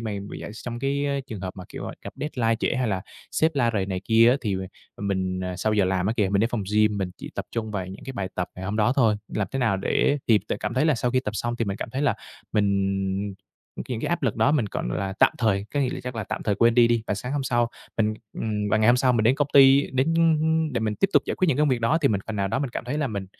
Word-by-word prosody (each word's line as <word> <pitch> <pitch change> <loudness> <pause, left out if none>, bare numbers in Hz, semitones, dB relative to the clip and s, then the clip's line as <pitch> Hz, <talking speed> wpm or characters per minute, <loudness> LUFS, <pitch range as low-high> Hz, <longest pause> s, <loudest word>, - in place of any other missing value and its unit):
mà 110 -2 -4 0.2
vừa - - -6
d - - -8 0.2
trong 120 -1 -4
cái 140 +1 -1
trường 110 -7 -7
hợp 95 -1 -6
mà, 90 - -8
kiểu, - - -7 0.2
gặp - - -7
deadline 120 -6 0
trễ 120 - -1
hay 125 -2 0
là 95 -2 -1 0.3
sếp 160 +1 +1
la 120 -4 +2
rầy 95 -2 0
này 95 -2 -3
kia 115 +1 +5
á, 130 - +3
thì 100 -4 -1
m 95 - -4 0.4
mình, 95 -2 -2
à, 90 0 -4
sau 110 +4 0
giờ 105 -2 +3
làm 95 0 0
á 110 - +1
kìa, 105 -4 +2
mình 100 +1 +2
đến 115 +3 +1
phòng 115 -4 -2
gym, 105 -1 +3
mình 95 -2 -2
chỉ - - -9
tập - - -3
trung 110 -2 -3
vào 95 -3 -3
những 95 +1 -10
cái 135 - -6
bài 100 -6 -3
tập 90 0 -2
ngày 90 - -7
hôm 100 +3 -2
đó 110 +3 +3
thôi. 115 -6 +4
Làm 100 - -2
thế 135 - -3
nào 110 -6 +2
để 140 +8 +1
thì 110 -2 +6
là - - -1
cảm 105 +3 -3
thấy 130 - +2
là 155 -2 +4
sau 120 +1 -1
khi 130 - +2
tập 105 -5 -4
xong 120 +2 -2
thì 115 - 0
mình 100 -2 -3
cảm - - -5
thấy 130 +5 -2
là 130 -7 +2 0.4
mình 100 -1 0 0.5
những 120 -3 -3
cái - - -2
áp 175 -1 -1
lực 115 -6 0
đó 115 +6 +3
mình, 150 -7 +2
gọi - - -3
là, 95 +10 -2
tạm - - +5
thời, 100 -4 +1
có 145 - +2
nghĩa 135 - +1
là - - -5
chắc 125 0 -5
là 110 -3 -3
tạm - - -4
thời 105 - +1
quên 115 +3 +4
đi 120 -1 +6
đi. 120 -1 +1
Và - - 0
sáng 125 +6 -5
hôm 145 -1 -1
sau 120 -2 +1 0.3
mình, 110 -1 +1 0.2
ừm, 105 -2 -2
và - - +4
ngày 110 0 +3
hôm 120 - +6
sau 125 0 +3
mình 110 -2 +1
đến 120 - +5
công 145 0 0
ty 135 0 +6
đến, 135 +5 +1
ưm, 165 -2 +3
ưm, 160 -1 +1
để 120 - -1
mình 110 -1 -1
tiếp 195 - +2
tục - - +5
giải - - -1
quyết 185 - +1
những 140 - +1
công 150 0 +3
việc 125 -3 +1
đó 145 +8 +2
thì 140 - +3
mình 100 -5 0
phần 110 -1 -4
nào 100 0 0
đó 135 - -1
mình 135 -2 -2
cảm - - -5
thấy 140 +5 -2
là 150 - 0
mình, 100 -5 -4
115 Hz, 315 wpm, -25 LUFS, 100-130 Hz, 0.5 s, thì